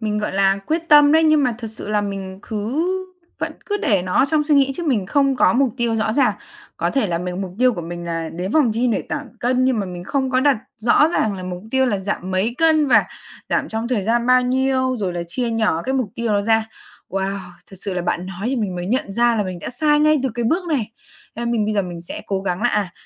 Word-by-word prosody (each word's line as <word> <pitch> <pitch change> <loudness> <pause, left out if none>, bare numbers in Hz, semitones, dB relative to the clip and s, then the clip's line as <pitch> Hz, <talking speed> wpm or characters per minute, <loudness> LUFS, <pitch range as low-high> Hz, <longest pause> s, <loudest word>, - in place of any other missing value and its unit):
mình, 210 -1 -1
gọi 210 - -2
là, 195 0 +2
quyết 330 +1 -2
tâm 295 -1 +7
đấy, 320 +1 +5
nhưng 310 -2 +4
mà 245 -2 0
thực 235 - -6
sự 220 - -9
là 210 0 +1
mình 195 -2 -5
cứ 230 +10 -2 0.5
vẫn - - -3
cứ 410 - 0
để 200 - +1
nó 180 0 -4
ở - - +6
trong 305 0 +2
suy 300 0 +2
nghĩ 275 -1 +4
chứ 345 - -5
mình 220 -10 +1
không 275 +2 +2
có - - +4
mục 255 -2 +1
tiêu 235 -2 0
rõ 220 0 0
ràng. 275 +4 +3 0.4
Có - - 0
thể 270 -6 +1
là 170 -2 -1
mình 180 +1 -4
mục 185 -2 -6
tiêu 255 0 +4
của 175 - -4
mình 175 +1 -6
là 165 -1 -3
đến 180 +6 -5
phòng 295 -7 +4
gym 240 +2 +1
để 220 - 0
giảm 295 0 -4
cân 255 +1 +2
nhưng 255 -3 +2
mà 200 - -2
mình 180 -1 -7
không 265 +4 -1
có 255 0 +2
đặt 280 -2 +4 0.2
rõ 240 +7 +4
ràng 220 -10 0
là 185 - -7
mục 180 0 -6
tiêu 265 +1 +2
là 210 -5 0
giảm 190 -1 -4
mấy 190 +6 0
cân? 315 -2 +4
Và - - +5 0.4
giảm - - 0
trong 225 +1 -3
thời 240 -5 0
gian 235 +2 +1
bao 255 0 +5
nhiêu? 260 0 +1
Rồi 190 -4 -2
là 175 0 -3
chia 235 +7 -2
nhỏ 220 -7 +1
cái 265 - -2
mục 255 -6 -1
tiêu 235 -2 -1
đó 205 - +2
ra. 220 +1 +2 0.4
Wow! 195 +1 -2 0.3
Thật 195 - -11
sự 195 0 -4
là 180 - -2
bạn 175 +1 -2
nói 190 +3 -5
thì 265 +2 0
mình 205 -5 -2
mới 175 0 -4
nhận 220 -1 -1
ra 235 +2 +2
là 210 - +1
mình 185 -2 -5
đã - - -6
sai 295 +4 +2
ngay 305 -1 +4
từ 265 - +1
cái 240 - -2
bước 340 +10 0
này. 255 -9 -1 0.5
Nên 235 +1 -2
mình 220 -3 +1
bây 215 +1 -1
giờ 200 - +2
mình 175 -2 -7
sẽ 170 - -7
cố 195 -1 -1
gắng 180 -2 -2
là, 245 - +3
à, 205 -6 -1
225 Hz, 275 wpm, -20 LUFS, 195-265 Hz, 0.5 s, tâm